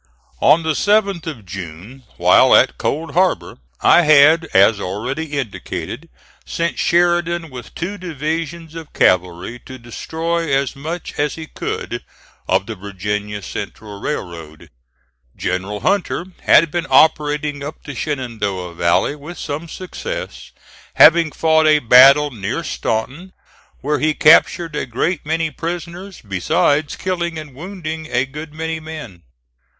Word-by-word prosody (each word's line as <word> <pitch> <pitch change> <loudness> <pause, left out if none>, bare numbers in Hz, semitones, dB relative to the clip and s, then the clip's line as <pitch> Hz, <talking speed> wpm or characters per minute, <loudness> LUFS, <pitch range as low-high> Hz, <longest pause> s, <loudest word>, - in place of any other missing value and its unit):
On 155 +4 +5
the 160 - 0
7th 200 -2 +1
of 130 -11 -7
June, 95 +8 -9
while - - +5
at - - +3
Cold 160 +3 -2
Harbor, 175 - 0 0.2
I - - +6
had 155 +1 +6
as 100 -3 +4
already 130 - -4
indicated 125 -8 -5 0.3
sent 170 0 -3
Sheridan 175 -2 +1
with 125 -1 -10
two 195 +4 -4
divisions 165 0 -4
of 165 -2 -10
cavalry 90 +6 +1
to 130 - -9
destroy 165 +7 -3
as 135 0 0
much 160 +5 -6
as 145 0 0
he 160 - -7
could - - -5 0.4
of - - +1
the - - -5
Virginia 105 +1 -4
Central 105 +1 -7
Railroad. 85 - -6 0.7
General 95 +3 -3
Hunter 185 - 0 0.2
had 165 -2 +5
been 175 0 -2
operating 150 0 +2
up 145 - -8
the 145 - -7
Shenandoah 110 - -4
Valley 85 - +1
with 150 +4 -10
some 150 +4 -5
success, 480 - -7 0.5
having 165 0 +6
fought 160 0 +3
a 155 0 +6
battle 140 +3 +6
near 115 +7 -4
Staunton 145 +9 -3 0.5
where 150 +2 0
he 155 0 +1
captured 165 +1 +4
a - - -3
great 150 +7 -2
many 160 0 0
prisoners, 175 +3 -6
besides 145 - +1
killing 170 -3 -3
and 150 -3 -8
wounding 160 0 -6
a 125 +1 +1
good 150 +3 -9
many 160 +1 -4
men. 155 - -9
150 Hz, 135 wpm, -19 LUFS, 115-165 Hz, 0.7 s, I